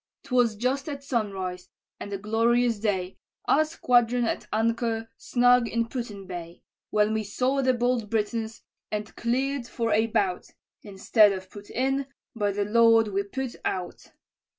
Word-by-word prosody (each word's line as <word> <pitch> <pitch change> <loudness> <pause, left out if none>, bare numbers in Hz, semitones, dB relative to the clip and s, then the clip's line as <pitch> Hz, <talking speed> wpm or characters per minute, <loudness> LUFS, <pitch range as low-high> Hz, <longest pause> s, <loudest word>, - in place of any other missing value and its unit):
"'Twas 245 -4 +2
just 260 +6 -1
at 280 -1 -6
sunrise, 195 -8 -3 0.3
and 205 - -7
a 200 - -2
glorious 230 +2 +1
day, 190 -4 -2 0.3
Our 310 - +4
squadron 245 -6 +2
at - - -3
anchor 225 0 0
snug 245 0 +3
in 230 0 -1
Put 240 -2 -4
in 200 -2 -9
Bay, 175 -2 -8 0.3
When 210 0 +2
we 220 0 0
saw 255 +7 0
the 255 -1 +2
bold 240 -3 0
Britons, 225 +1 -2 0.3
and 210 0 -4
cleared 260 +2 -1
for 230 -3 -2
a 220 +2 +3
bout, 190 -4 0 0.3
Instead 205 +1 +3
of 185 -1 -8
put 205 0 -11
in, 270 +2 0 0.3
by 205 -2 0
the 200 +1 -1
Lord 225 0 +5
we 200 0 0
put 250 +5 -5
out. 180 -1 -4
225 Hz, 155 wpm, -26 LUFS, 205-245 Hz, 0.3 s, Lord